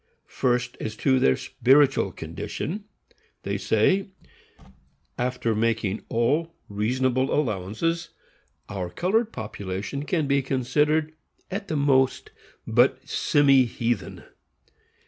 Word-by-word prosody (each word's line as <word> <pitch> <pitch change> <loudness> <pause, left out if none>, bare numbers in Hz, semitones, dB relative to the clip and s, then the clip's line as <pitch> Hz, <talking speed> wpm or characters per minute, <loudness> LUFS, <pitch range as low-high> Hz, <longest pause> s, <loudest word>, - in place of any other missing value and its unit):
First, 125 -1 -1
as 110 0 -4
to 130 +3 +2
their 65 - +4
spiritual 135 +2 +3
condition, 200 +6 -5 0.6
they - - -2
say: 195 0 +2 1.1
After 125 -2 -1
making 110 -2 -1
all 145 +9 0
reasonable 130 +5 0
allowances, 140 - -1 0.6
our 95 -3 -4
colored 215 - 0
population 105 +4 -5
can 160 -2 0
be 140 0 +2
considered, 150 +4 +1 0.4
at 200 +2 -4
the 155 - -1
most, 135 -2 +2 0.3
but 125 +3 +2
semi 140 -4 +4
heathen. 115 -2 -3
130 Hz, 100 wpm, -25 LUFS, 115-150 Hz, 1.1 s, their